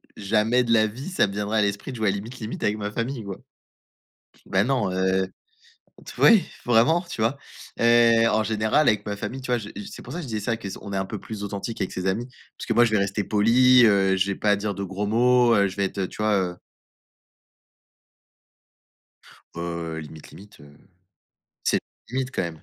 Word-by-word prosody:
jamais 110 +5 +1
de 115 - -2
la 110 -1 +4
vie 130 - -7
ça 180 - +2
me 100 - -7
viendrait 105 +2 -1
à - - +3
l'esprit 100 +5 -2
de 125 - -7
jouer 110 -1 0
à - - +4
Limite 110 +6 -6
Limite 110 0 -6
avec 105 +1 +1
ma 105 0 -3
famille 115 +1 -3
quoi. 100 -2 -6 1.1
Ben 95 +2 +2
non, 130 -7 0
heu, 95 0 +1 0.8
t - - -8
oui 220 -7 +6 0.2
vraiment 125 +9 +3
tu 170 -10 -8
vois? 115 +6 +1 0.4
Heu, 115 -1 +5
en 110 - +2
général 110 +7 +1
avec 105 -1 +1
ma 105 - -3
famille 125 +6 -6
tu 125 - -6
vois, 120 - +2
je 105 -2 -8 0.2
c'est - - -10
pour 130 - -9
ça 175 - -4
que - - -7
je 135 - -8
disais 110 -2 -3
ça 115 +2 -1
qu'on 100 -1 -8
est - - -1
un 95 - 0
peu 105 +2 -6
plus 105 -2 -7
authentique 100 +3 -4
avec 95 - -3
ses 90 +1 -4
amis 115 +7 -1 0.3
parce - - -8
que 115 - 0
moi 120 +1 +5
je 110 - -2
vais 105 - +3
rester 100 +1 -1
poli, 120 +4 +5
heu, 95 -3 +3
je 95 +1 +1
vais 100 - -3
pas 105 -1 +2
dire 100 -1 -3
de 100 - -4
gros 95 +2 -4
mots, 120 +2 +4
heu, 100 -1 +3
je 95 - -9
vais 100 - 0
être 95 0 -2
tu 105 - -7
vois, 110 -1 +2
heu? 90 -2 -1 3.0
Heu, 85 -1 -4
Limite 75 0 -11
Limite, 100 +1 -15
heu, 70 0 -17 0.9
c'est - - +2 0.3
limite 130 0 -2
quand - - -1
même. 85 -2 -6
105 Hz, 215 wpm, -24 LUFS, 100-120 Hz, 3.0 s, oui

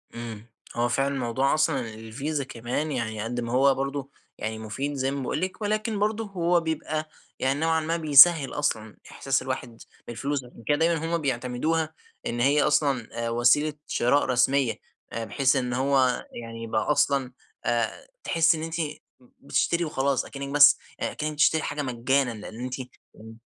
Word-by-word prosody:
إمم، 115 -2 -7 0.3
هو 120 0 +1
فعلًا 135 +3 +1
الموضوع 130 +1 0
أصلًا 155 -2 +2
الفيزا 135 +7 -4
كمان 130 +4 -3
يعني 110 -5 -3
قد 120 +2 -3
ما 115 -1 -4
هو 135 +2 +4
برضه 140 0 -3 0.3
يعني 110 0 -4
مفيد 120 +7 -4
زي 135 -1 -1
ما 140 0 -3
باقول 130 - -2
لِك، 185 +3 -4
ولكن 215 0 -1
برضه 215 +2 0
هو 175 -3 +1
بيبقى 155 -1 -3 0.3
يعني 135 +2 0
نوعًا 160 0 +2
ما 165 +2 -1
بيسهّل 155 -1 +7
أصلًا 110 -8 -2
إحساس 135 0 0
الواحد 130 -3 -5 0.3
بالفلوس؛ 135 +3 -3
عشان 120 -1 -15
كده 145 - +3
دايمًا 165 0 +1
هم 170 +1 0
بيعتمدوها 140 +5 -1 0.3
إن 120 - -3
هي 140 +4 +4
أصلًا 140 -5 +1 0.2
آآ - - -1
وسيلة 120 +6 +3
شراء 130 +4 +2
رسمية، 130 0 +2 0.4
آآ 115 0 -3
بحيث 130 +6 +2
إن 125 -2 -1
هو 130 -1 +2 0.2
يعني 115 0 -8
يبقى 110 -1 -1
أصلًا 140 -2 +2 0.3
آآ، 120 - -1 0.2
تحسي 165 -1 +3
إن 155 - -5
أنتِ 165 0 -4 0.6
بتشتري 170 +4 0
وخلاص 140 -3 0
أكنك 140 0 -7
بس 145 0 +8 0.4
كأنِك 155 0 -2
بتشتري 155 +1 +3
حاجة 145 0 -3
مجانا، 130 0 +1
لأن 110 +1 -9
أنتِ 125 0 -3 0.4
إمم. 110 +1 -13
135 Hz, 165 wpm, -26 LUFS, 120-155 Hz, 0.6 s, بس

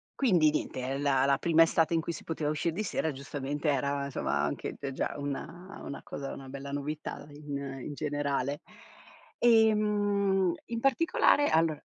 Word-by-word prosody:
Quindi 175 - +4
niente, 140 - -3
ehm, 135 +2 -2
la 135 -2 +3
la 140 -1 +3
prima 165 -1 +5
estate 165 0 +2
in 165 - +2
cui 170 - -3
si - - -8
poteva 155 -2 -2
uscir 155 +2 0
di 210 +6 -3
sera, 160 -5 -1
giustamente 140 +2 -3
era 140 0 0
insomma, 140 - -1
anche - - -3
t 140 -1 -5
già - - -2
una 165 +6 -6
una 140 - -6
cosa 135 -1 -6
una 135 -1 -9
bella 140 +1 -7
novità 145 +1 -4
in 145 -1 -6 0.3
in 150 - -5
generale. 145 -1 -2 0.8
Ehm, 205 -4 +3
in 230 -1 -3
particolare, 290 +2 +3
allora 160 -2 +2
150 Hz, 165 wpm, -30 LUFS, 140-185 Hz, 0.8 s, prima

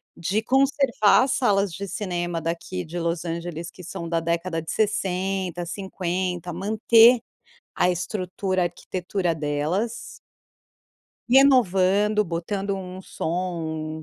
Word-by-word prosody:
de 185 +6 -1
conservar 265 -3 +3
as 265 - 0
salas 205 -8 +2
de 200 +4 -5
cinema 175 -3 -3
daqui 165 - -4
de 175 - -7
Los 170 0 -2
Angeles, 170 0 -4
que 180 - -13
são 170 0 -6
da 165 0 0
década 170 0 -1
de 160 - -6
60, 190 -4 -1
50, 180 -1 -3
manter 225 +5 +5 0.6
a 180 - +3
estrutura, 185 0 -2
arquitetura 175 0 -2
delas. 155 +10 -2 1.1
Renovando 210 -6 +4
botando 195 +4 -3
um 185 -1 -7
som, 160 -3 -3
185 Hz, 110 wpm, -24 LUFS, 170-205 Hz, 1.1 s, manter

